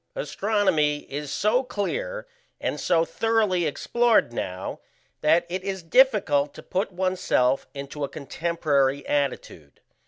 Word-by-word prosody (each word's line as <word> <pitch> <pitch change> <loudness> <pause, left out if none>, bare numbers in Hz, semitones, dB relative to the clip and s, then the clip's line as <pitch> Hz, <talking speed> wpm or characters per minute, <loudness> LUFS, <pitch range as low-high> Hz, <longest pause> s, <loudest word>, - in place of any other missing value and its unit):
Astronomy 190 - +1
is 145 0 -4
so 215 +5 +2
clear - - -3 0.3
and - - -2
so 165 -2 +2
thoroughly 210 -5 +1
explored 235 - +2
now, 95 -4 -4 0.4
that 160 +3 +4
it 185 +2 -4
is 190 -2 -4
difficult 165 - +3
to - - -10
put 195 +3 -2
oneself 180 -8 +1
into 140 +1 -6
a 140 - -2
contemporary 145 -3 0
attitude. 135 - -3
170 Hz, 120 wpm, -25 LUFS, 145-210 Hz, 0.4 s, that